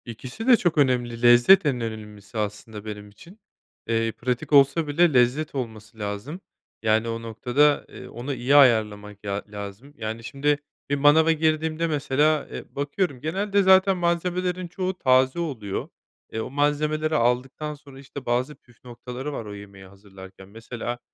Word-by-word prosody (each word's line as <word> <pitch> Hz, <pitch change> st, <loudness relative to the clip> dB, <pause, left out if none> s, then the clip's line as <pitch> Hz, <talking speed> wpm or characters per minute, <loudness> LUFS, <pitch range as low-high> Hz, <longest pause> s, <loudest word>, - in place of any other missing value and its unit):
İkisi 125 Hz, -, -8 dB
de 250 Hz, -2 st, +7 dB
çok 175 Hz, -6 st, 0 dB
önemli. 120 Hz, -4 st, +1 dB
Lezzet 120 Hz, +11 st, +6 dB
en 130 Hz, -4 st, 0 dB
önemlisi 110 Hz, -1 st, -7 dB
aslında 105 Hz, 0 st, -5 dB
benim 105 Hz, -1 st, -7 dB
için. 175 Hz, -, -17 dB, 0.5 s
Eee, 115 Hz, 0 st, 0 dB
pratik 125 Hz, +5 st, -3 dB
olsa 140 Hz, +3 st, +5 dB
bile 160 Hz, +2 st, +3 dB
lezzet 130 Hz, +5 st, +2 dB
olması 110 Hz, -4 st, -6 dB
lazım. 105 Hz, -, -5 dB, 0.4 s
Yani 110 Hz, +1 st, +2 dB
o 115 Hz, 0 st, -4 dB
noktada, 125 Hz, +6 st, +1 dB
eee, -, -, -11 dB
onu 130 Hz, +4 st, -5 dB
iyi 130 Hz, +2 st, +1 dB
ayarlamak 105 Hz, -6 st, +3 dB
ya 100 Hz, 0 st, -3 dB
lazım. 105 Hz, +7 st, -9 dB
Yani 110 Hz, +1 st, -5 dB
şimdi 145 Hz, +4 st, 0 dB, 0.3 s
bir 145 Hz, -, +1 dB
manava 150 Hz, +3 st, +5 dB
girdiğimde 160 Hz, +1 st, 0 dB
mesela, 150 Hz, 0 st, +1 dB
eee, -, -, -7 dB
bakıyorum 145 Hz, -1 st, -2 dB
genelde 195 Hz, +6 st, 0 dB
zaten 190 Hz, 0 st, +5 dB
malzemelerin 180 Hz, +1 st, -1 dB
çoğu 185 Hz, +1 st, -4 dB
taze 130 Hz, +2 st, +3 dB
oluyor. 115 Hz, -, -4 dB, 0.4 s
Eee, 110 Hz, -, -4 dB
o -, -, -5 dB
malzemeleri 150 Hz, +2 st, 0 dB
aldıktan 130 Hz, +5 st, 0 dB
sonra, 140 Hz, -2 st, -14 dB
işte, 140 Hz, 0 st, -10 dB
bazı 125 Hz, +5 st, -1 dB
püf 120 Hz, -2 st, -26 dB
noktaları 125 Hz, +3 st, -7 dB
var 115 Hz, -, -5 dB
o 105 Hz, -, -8 dB
yemeği 100 Hz, -1 st, -12 dB
hazırlarken 95 Hz, -1 st, -14 dB
mesela 120 Hz, +2 st, -6 dB
130 Hz, 155 wpm, -24 LUFS, 110-155 Hz, 0.5 s, de